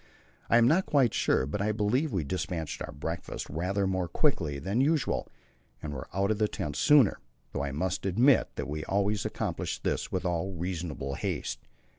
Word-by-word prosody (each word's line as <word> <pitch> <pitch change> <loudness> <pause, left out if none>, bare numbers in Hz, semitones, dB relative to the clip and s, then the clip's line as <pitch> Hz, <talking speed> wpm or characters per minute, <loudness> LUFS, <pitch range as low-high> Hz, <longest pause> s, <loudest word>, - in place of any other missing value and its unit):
I 115 - +6
am 120 0 +6
not 170 +8 +3
quite 135 -7 +3
sure, - - +2
but 85 +9 -3
I 105 +1 +1
believe 115 +8 +1
we 95 -7 0
despatched 85 -1 -3
our - - -4
breakfast 80 +2 -5
rather 95 +6 0
more 95 -2 0
quickly 85 - +1
than 100 - 0
usual 145 -2 +1 0.5
and 75 0 -5
were 65 - -6
out 100 +3 +1
of 110 - -1
the 105 - +3
tent 75 -7 -4
sooner, 135 - +5 0.3
though 70 - -2
I 70 - -2
must 90 +7 -2
admit 120 +7 +4
that - - -3
we 75 +1 -4
always 100 +1 0
accomplished - - -3
this - - -1
with - - -2
all 90 +2 -1
reasonable 85 -6 -3
haste. - - -3
95 Hz, 185 wpm, -29 LUFS, 80-110 Hz, 0.5 s, I